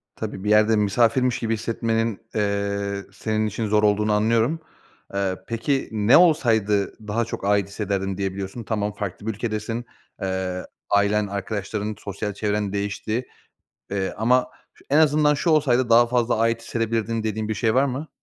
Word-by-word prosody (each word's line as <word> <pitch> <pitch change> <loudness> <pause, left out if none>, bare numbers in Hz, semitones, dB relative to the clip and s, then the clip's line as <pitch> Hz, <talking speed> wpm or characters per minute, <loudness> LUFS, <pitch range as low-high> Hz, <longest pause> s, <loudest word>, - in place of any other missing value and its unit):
Tabii, 105 -3 -5
bir 105 - -1
yerde 110 +1 +5
misafirmiş 115 +4 +2
gibi 115 -1 -1
hissetmenin, 115 0 -1
eee, 100 -1 -1
senin 110 +1 -1
için 110 +1 -3
zor 105 +1 +2
olduğunu 105 0 +3
anlıyorum. 115 +8 +2 0.5
Eee, 95 -1 0
peki 125 +4 -1
ne 110 +2 +5
olsaydı 110 - +2
daha 115 +3 0
çok 110 - -6
ait 100 -1 +2
hissederdim 100 -2 -2
diyebiliyorsun? 95 +3 -4
Tamam, 105 -1 -2
farklı 100 0 -6
bir - - +1
ülkedesin. 115 +2 -3 0.4
Eee, 95 -1 -2 0.2
ailen, 100 +1 +2
arkadaşların, 100 +1 -3
sosyal 100 +1 -4
çevren 105 -1 -1
değişti. 105 +4 -2 0.7
Eee, 95 -1 -2
ama 125 +4 +2 0.4
en 150 - +4
azından 150 -1 +4
şu 165 +4 0
olsaydı 130 -6 +3
daha 120 +1 +7
fazla 120 -2 +1
ait 115 0 +1
hissedebilirdim 115 -1 -1
dediğin 110 0 -2
bir 110 - -1
şey 110 +2 +1
var 135 +2 +4
mı? 140 +4 -3
110 Hz, 150 wpm, -23 LUFS, 100-115 Hz, 0.7 s, daha